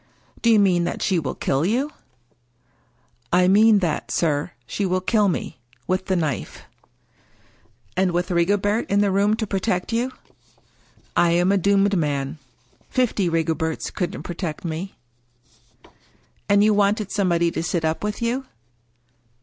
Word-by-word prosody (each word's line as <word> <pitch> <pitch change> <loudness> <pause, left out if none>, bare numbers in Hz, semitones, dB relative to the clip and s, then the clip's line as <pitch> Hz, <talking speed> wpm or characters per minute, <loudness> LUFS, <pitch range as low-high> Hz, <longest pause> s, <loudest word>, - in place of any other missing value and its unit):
" - - -28
Do 235 - +3
you 225 - +6
mean 185 -4 +3
that - - -3
she 185 -4 +2
will 145 -5 -4
kill 135 +2 0
you? 250 - 0 0.4
" 120 0 -42
" - - -40 0.3
I 180 +1 +4
mean 210 +3 +6
that, 155 - -3
sir, 150 -3 0 0.2
she 205 - -3
will 185 -1 +1
kill 210 +2 +2
me 170 -7 -3
— 120 - -32
with 185 +1 -1
the 190 - +1
knife." 155 -7 -3 0.6
" - - -35
And 185 0 +2
with 175 +2 -1
Rigobert 205 +5 +1
in 200 +1 +3
the 200 -1 +2
room 200 +2 +2
to 220 - -2
protect 195 +1 -2
you? 245 +3 0 0.4
" - - -35
" - - -33
I 175 - +4
am 175 +2 +3
a 200 - +3
doomed 200 +1 +3
man. 145 -3 -2 0.5
Fifty 220 -7 +1
Rigoberts 160 -1 -1
couldn't 180 -3 -3
protect 170 -2 -5
me." 170 +4 -5 0.8
" 120 +1 -31
And 200 0 +5
you 215 0 +4
wanted 205 0 +1
somebody 170 -4 +1
to 165 - -3
sit 170 -1 -1
up 160 +4 -1
with 210 +2 -3
you 250 +3 -1
185 Hz, 170 wpm, -22 LUFS, 165-205 Hz, 0.8 s, you